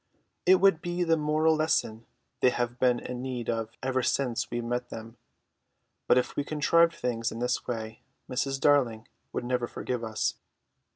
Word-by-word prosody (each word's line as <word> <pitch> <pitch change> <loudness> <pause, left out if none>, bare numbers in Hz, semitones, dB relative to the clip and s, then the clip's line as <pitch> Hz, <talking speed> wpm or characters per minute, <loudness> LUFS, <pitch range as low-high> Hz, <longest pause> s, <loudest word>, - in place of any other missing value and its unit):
It 185 - +8
would 195 -3 +4
be 175 0 -1
the 165 -1 +3
moral 155 +1 +2
lesson 115 -8 0 0.3
they 125 - +5
have 120 0 -2
been 125 -1 +3
in 125 0 -6
need 125 -3 -3
of 115 -1 -2
ever 130 0 +1
since 125 -2 0
we 120 - -2
met 120 +1 -3
them; 115 +1 -9 0.9
but - - +5
if 125 - 0
we 145 - 0
contrived 165 +3 +3
things 115 -2 -2
in - - -6
this 125 +1 -1
way 110 -2 -5 0.3
Mrs. 135 +1 -1
Darling 125 -6 +2 0.2
would 120 - -3
never 125 -1 0
forgive 125 0 -4
us. 110 -1 -1
125 Hz, 170 wpm, -28 LUFS, 120-150 Hz, 0.9 s, It